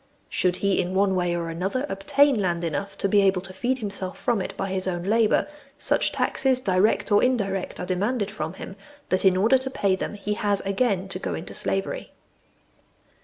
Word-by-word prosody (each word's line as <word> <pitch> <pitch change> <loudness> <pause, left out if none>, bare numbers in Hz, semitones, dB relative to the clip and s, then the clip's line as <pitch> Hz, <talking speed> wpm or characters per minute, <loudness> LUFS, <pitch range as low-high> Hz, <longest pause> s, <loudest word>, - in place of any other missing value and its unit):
Should 180 -1 +1
he, 200 0 +1
in 185 +1 -4
one 195 0 +3
way 175 -2 0
or 170 -1 -3
other, 195 - -2
obtain 280 +8 +3
land 175 -3 0
enough 195 +5 -3
to 200 - 0
be 205 +1 +4
able 190 -2 +3
to 190 -1 -8
feed 255 +6 -1
himself 200 -5 -3
from 235 -5 0
it - - -6
by 195 - -2
his 190 0 -1
own 175 -2 -2
labour, 215 +3 +2 0.3
such - - +1
taxes, 260 -2 +1
direct 200 0 +1
or 205 - +5
indirect, 195 -7 0
are 180 - -3
demanded 205 +4 -1
from 160 -6 -4
him, 190 +1 -9 0.3
that 185 +1 +1
in 185 -1 +5
order 225 +7 +4
to 260 +1 -4
pay 200 -7 +1
them 190 - -4
he 205 +1 -3
has 205 -1 0
again 195 -1 0
to 185 - -2
go - - -3
into 165 - -7
slavery. 195 0 -2
195 Hz, 200 wpm, -25 LUFS, 185-215 Hz, 0.3 s, or